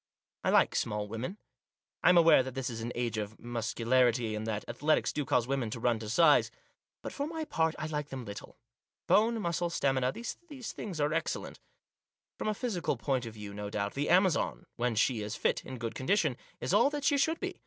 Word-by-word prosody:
I - - +1
like - - +4
small 105 0 -1
women. 115 - -5 0.7
I - - +7
am 180 - +6
aware 165 -4 +7
that 130 0 -6
this 130 -1 -2
is 115 -1 -5
an 120 +2 -3
age 120 -2 -1
of 105 +1 -5
muscularity, 120 0 +1
and 105 +1 -4
that 105 -2 -2
athletics 150 +6 +1
do 150 - -1
cause 125 -2 +2
women 130 -3 -1
to 115 - -5
run 115 -1 +1
to 110 -1 -6
size. 150 +6 +5 0.5
But, - - -5
for 285 +1 -2
my 320 -1 -4
part, 160 - 0
I 155 - -4
like 150 -2 -3
them 130 -2 -6
little. 100 -1 -9 0.5
Bone, 225 +2 +3
muscle, 170 -2 -1
stamina, 135 -5 +1
these, 235 - -5 0.4
things 185 -7 -6
are 145 +1 +1
excellent. 165 - -3 0.8
From - - -2
a 215 - 0
physical 215 -7 -1
point 130 -4 -1
of 110 - -9
view, 105 -1 -8
no 105 0 -5
doubt, 100 -1 -2
the 145 +2 -1
Amazon, 180 -3 +2
when 120 -1 0
she 115 +1 +2
is 105 +2 -4
fit, - - 0
in 130 - -7
good 115 -1 -4
con 130 -4 -6
dition, 165 -9 +3 0.2
is - - -2
all 230 +7 +5
that 290 -1 -4
she 280 0 +3
should 320 +4 +1
be. - - -5
130 Hz, 215 wpm, -31 LUFS, 115-170 Hz, 0.8 s, I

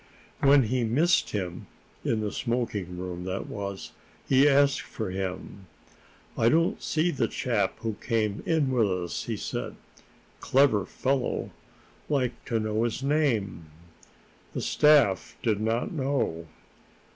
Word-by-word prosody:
When 140 0 +6
he 125 +2 0
missed 150 +10 +2
him, 90 -4 -4 0.4
in 110 -2 0
the 105 -1 -2
smoking 105 -7 -2
room, 90 -1 -5
that 95 +1 -3
was, 100 -2 -6 0.4
he 135 +2 +5
asked 140 0 +4
for 110 -5 -5
him. 95 0 -5 0.7
"I 115 - +3
don't 165 +4 +2
see 160 +3 +1
the 130 -6 0
chap 115 -3 -1
who 110 -2 -3
came 110 -3 -1
in 155 -5 +2
with 115 -6 +2
us," 90 -2 -3
he - - -3
said. - - -4 0.6
"Clever 130 -7 +3
fellow. 135 -1 -1 0.6
Like 130 -5 -1
to 115 - 0
know 110 0 -1
his 120 +3 -2
name." 115 - 0 0.8
The - - -3
staff 145 -11 +3
did 110 -3 +1
not 115 +2 0
know. 130 - -1
115 Hz, 135 wpm, -27 LUFS, 100-135 Hz, 0.8 s, When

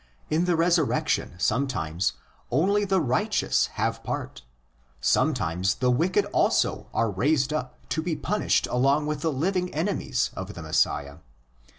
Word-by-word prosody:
In 160 +3 +2
the 175 -1 +2
resurrection 165 - +1
sometimes 95 - 0 0.4
only 200 +10 +2
the 190 -1 +2
righteous 130 -5 +1
have - - -1
part; 65 - -5 0.6
sometimes 85 +8 +1
the 125 -1 +1
wicked 185 +10 +2
also - - +1
are 115 -2 0
raised 135 +7 +1
up 140 -5 -4
to 160 - 0
be 165 0 -2
punished 210 +6 +1
along 135 +4 +2
with 150 -1 -3
the 160 - 0
living 180 +6 -1
enemies 160 -6 -1
of 95 +2 -6
the 85 - -7
Messiah. 75 -2 0
140 Hz, 135 wpm, -26 LUFS, 100-170 Hz, 0.6 s, In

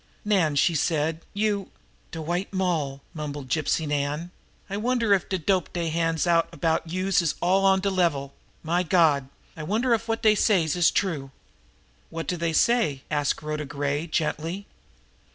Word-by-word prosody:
"Nan," 185 -8 +2
she 165 +4 +3
said, 160 +1 0
"you 205 -2 -1 0.2
" - - -36
"De 165 - -6
White 175 +5 -2
Moll!" 165 -8 -1
mumbled 145 -3 -6
Gypsy 155 +3 0
Nan. 150 +4 -2 0.4
"I 200 - -4
wonder 230 0 +1
if 195 - +1
de 190 - 0
dope 185 +2 0
dey 170 -2 -1
hands 165 0 0
out 165 -1 +3
about 165 -1 -1
youse 185 +1 +1
is 165 -3 0
all 190 +3 +2
on 190 0 +4
de 200 +1 0
level? 160 -7 0 0.3
My 170 +3 +1
Gawd, 155 -6 +3 0.3
I 160 - -7
wonder 225 +9 +1
if 230 0 -1
wot 225 0 -2
dey 215 -1 +6
says 185 -7 +2
is 175 -2 +4
true?" 155 -9 -1 0.8
"What 165 -1 -5
do 180 - -1
they 170 -1 -1
say?" 160 - +2
asked 145 -1 0
Rhoda 150 0 -3
Gray 145 +2 -2
gently. 165 +5 -2
165 Hz, 170 wpm, -25 LUFS, 150-190 Hz, 0.8 s, dey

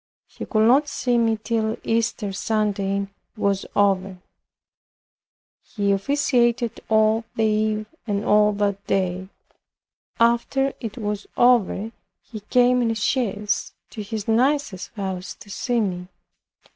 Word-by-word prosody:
He - - -9
could 220 -1 +3
not 275 +5 +4
see 245 -4 0
me 225 -1 +2
till 220 0 -1
Easter 225 -3 -1
Sunday 200 -1 -1 0.3
was 200 -2 0
over. 195 -2 +1 1.4
He 200 -2 -2
officiated 240 +1 +1
all 220 +1 +3
the 225 - 0
eve 215 0 +1 0.2
and 205 -1 -1
all 210 0 +4
that 200 -1 -1
day. 185 0 -1 0.9
After 235 +4 +2
it 225 -1 -6
was 210 -3 -4
over, 230 -3 +3 0.3
he 220 - -9
came 250 +4 +3
in 235 - +1
a 225 - -1
chaise 210 -2 -1 0.2
to 220 - -6
his 210 0 -5
niece's 245 -3 +1
house 190 -3 -4
to 205 - -14
see 245 +3 -1
me. 180 -4 -2
215 Hz, 125 wpm, -23 LUFS, 200-235 Hz, 1.4 s, not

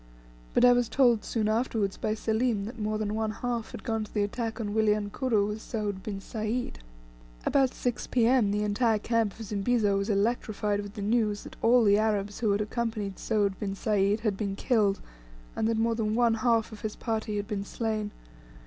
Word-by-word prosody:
But - - +6
I 245 - +8
was 245 -2 +1
told 240 -5 +3
soon 220 -3 -1
afterwards 215 -3 0
by 215 - -1
Selim 220 -1 0
that 230 +2 -8
more 215 0 -1
than 210 -1 -2
one 220 0 -1
half 230 +1 -3
had - - -8
gone 225 -1 -1
to 210 - -10
the 210 - +1
attack 225 +2 -3
on 205 -2 -3
Wilyankuru 210 +1 +1
with 210 +1 -5
Soud 210 -5 -3
bin 200 -1 -5
Sayd. 220 - -3 0.7
About 270 -2 +2
6 245 -1 -2
P.M. 240 -2 +3
the 210 +1 0
entire 215 +2 +2
camp 225 -1 0
of 225 - -6
Zimbizo 205 0 +1
was 195 - -2
electrified 210 -1 0
with 205 0 -9
the 205 - -4
news 210 -1 +1
that - - -10
all 240 +1 +5
the 205 -1 +5
Arabs 205 -2 0
who 220 -2 +1
had 200 +1 +2
accompanied 210 -3 -3
Soud 205 -3 0
bin 195 -2 -3
Sayd 205 +1 +1
had 215 -3 0
been 195 -1 -3
killed; 210 -4 +2 0.6
and 220 - 0
that 225 0 +1
more 230 +1 +2
than 220 -1 -1
one 235 -1 +4
half 230 0 +1
of 215 - -10
his 215 -1 -4
party 220 -2 -2
had 205 0 -3
been 205 -3 -3
slain. 215 0 -2
215 Hz, 200 wpm, -28 LUFS, 205-230 Hz, 0.7 s, I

